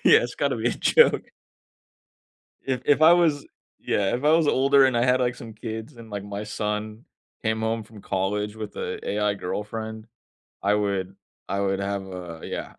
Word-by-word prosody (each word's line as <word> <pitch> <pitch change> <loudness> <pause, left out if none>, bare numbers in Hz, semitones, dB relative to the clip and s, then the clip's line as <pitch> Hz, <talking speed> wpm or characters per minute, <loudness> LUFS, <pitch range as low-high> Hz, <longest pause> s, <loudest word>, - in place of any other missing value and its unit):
Yeah, - - +8
it's - - -4
gotta - - 0
be - - -2
a - - +1
joke. 475 0 +3 1.3
If 130 -2 -2
if 145 +2 +3
I 165 +2 +9
was 160 -5 +3 0.3
Yeah, 100 -1 0
if 125 +4 -3
I 150 - +5
was 160 -1 +4
older 135 0 +5
and 130 -2 +2
I 120 - +3
had, 130 0 +3
like, 125 -1 +1
some 115 -2 -10
kids 110 +3 -7
and, 115 -1 -12
like, 100 -1 -4
my 100 +1 -5
son 105 +1 -4 0.4
came 110 0 0
home 110 0 -1
from 105 -1 -14
college 105 +2 -1
with 105 -1 -7
a - - -3
AI 105 0 +1
girlfriend, 110 +3 -5 0.6
I 100 +1 +3
would 100 -2 -1 0.3
I 100 +1 -1
would 95 -1 0
have 100 0 -2
a 90 -3 -8
yeah. - - -5
110 Hz, 190 wpm, -25 LUFS, 100-125 Hz, 1.3 s, I